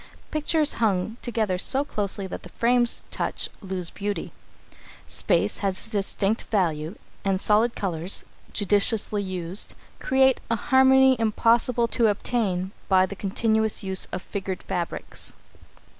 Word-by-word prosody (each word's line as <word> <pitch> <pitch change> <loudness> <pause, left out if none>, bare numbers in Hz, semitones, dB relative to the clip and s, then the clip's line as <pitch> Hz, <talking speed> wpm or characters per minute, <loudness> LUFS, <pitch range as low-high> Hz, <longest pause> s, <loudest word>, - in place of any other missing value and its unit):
Pictures 305 0 +1
hung 210 +1 0
together 215 -6 -1
so 275 +8 +6
closely 200 -5 -3
that 190 - -7
the 180 - -12
frames 240 +4 +2
touch - - -3
lose 185 -3 -1
beauty. 205 0 -4 0.7
Space - - 0
has 195 +2 -1
distinct 205 +1 -1
value, 165 -4 -1 0.3
and 195 -1 0
solid 215 +4 +2
colours, 180 -1 +4 0.3
judiciously 205 +1 +1
used, 185 -1 -2 0.2
create 265 0 +2
a 230 - +2
harmony 265 +2 +4
impossible 235 +2 +2
to 230 0 +2
obtain 200 -3 -1 0.2
by 185 -1 +4
the 200 - -8
continuous 220 +3 0
use 190 -1 -1
of - - -5
figured 195 -2 -5
fabrics. 175 -2 -5
205 Hz, 125 wpm, -24 LUFS, 190-235 Hz, 0.7 s, so